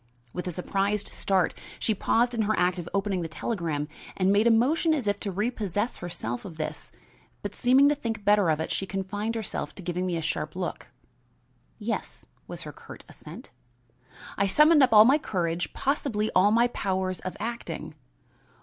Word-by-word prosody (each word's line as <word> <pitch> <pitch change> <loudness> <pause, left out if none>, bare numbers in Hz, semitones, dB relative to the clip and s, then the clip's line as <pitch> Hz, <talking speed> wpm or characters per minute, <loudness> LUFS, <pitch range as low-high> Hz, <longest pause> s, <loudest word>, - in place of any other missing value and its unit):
With 180 - -4
a - - -1
surprised 195 +4 -1
start, 190 -3 +1 0.2
she 220 - +1
paused 235 +4 +1
in 230 - 0
her 215 0 +1
act 180 0 +2
of 175 - -6
opening 195 -2 0
the 165 - -3
telegram 165 -5 -3 0.3
and 190 0 +3
made 210 +3 +4
a - - +6
motion 300 +8 +3
as 270 -7 -2
if 205 0 +1
to 200 - -3
repossess 210 +1 -2
herself 120 -9 -5
of 170 -5 -9
this, 155 - -5 0.5
but - - -4
seeming 260 +3 +5
to - - +3
think 225 -7 -4
better 205 -4 +4
of 155 -1 +2
it 160 - -3
she 195 - -2
confined 205 +4 -3
herself 220 -3 -4
to 190 - -9
giving 180 +1 -2
me 175 -2 -1
a - - -2
sharp 155 -1 -3
look. 180 -1 -4 0.9
"Yes," - - -4 0.2
was - - -7
her - - -8
curt - - -12
assent. - - -12 0.9
I 200 - +3
summoned 300 - +6
up 260 - +5
all 215 -1 +9
my 275 +5 +5
courage, 175 - -2
possibly 255 -6 -1
all 185 +3 +6
my 230 +2 +5
powers 190 -4 -2
of 185 - -6
acting. 235 +3 -5
200 Hz, 185 wpm, -27 LUFS, 180-230 Hz, 0.9 s, all